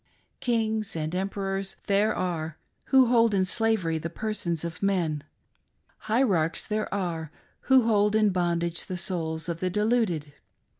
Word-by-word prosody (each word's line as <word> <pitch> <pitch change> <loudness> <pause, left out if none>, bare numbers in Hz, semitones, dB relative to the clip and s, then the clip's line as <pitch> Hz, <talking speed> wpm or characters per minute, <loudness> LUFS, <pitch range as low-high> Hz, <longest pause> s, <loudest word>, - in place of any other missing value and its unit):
Kings 220 -4 0
and 155 0 -3
emperors 195 0 -2
there 205 +2 +2
are 165 -4 -3 0.3
who 265 -1 +5
hold 230 -3 +4
in 190 -1 +2
slavery 190 -6 +1
the 165 - -4
persons 175 -4 -2
of 170 0 -6
men: 170 -7 0 0.9
hierarchs 190 -9 +2
there 215 0 -2
are 170 -6 -3 0.4
who 260 -2 +7
hold 210 -2 +3
in 215 -2 +4
bondage 170 -2 -1
the 185 - -4
souls 165 -2 -3
of 170 -1 -3
the 185 - 0
deluded. 210 -8 0
190 Hz, 140 wpm, -27 LUFS, 170-215 Hz, 0.9 s, who